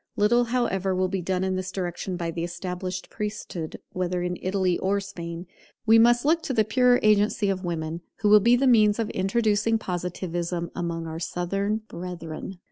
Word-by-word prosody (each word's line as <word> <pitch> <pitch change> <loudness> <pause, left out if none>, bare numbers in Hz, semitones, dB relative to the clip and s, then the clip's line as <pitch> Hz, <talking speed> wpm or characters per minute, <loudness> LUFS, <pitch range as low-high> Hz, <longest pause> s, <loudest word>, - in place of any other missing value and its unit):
Little, 240 +4 +3
however, 195 -6 0
will 185 0 +1
be 190 0 -2
done 185 +1 -1
in 190 0 0
this 185 0 -3
direction 180 0 -4
by 170 -1 -2
the 165 0 -4
established 180 +1 -5
priesthood, 210 -6 -5
whether 180 -1 -1
in 180 0 -2
Italy 185 -1 0
or 200 +2 +1
Spain. 175 -3 -7 0.4
We 225 0 +6
must 240 +2 +5
look 325 +2 +3
to 275 - -3
the 220 -2 +3
purer 245 +2 +4
agency 210 0 +3
of 190 0 -4
women, 165 -1 -3 0.2
who 210 - +3
will 210 0 +8
be 235 +4 +5
the 265 +3 +2
means 215 -5 +5
of 225 -2 -2
introducing 215 +2 +1
Positivism 175 -2 -3
among 170 -1 -3
our 160 0 -5
Southern 195 +5 -2
brethren. 175 0 -7
190 Hz, 180 wpm, -25 LUFS, 175-215 Hz, 0.4 s, will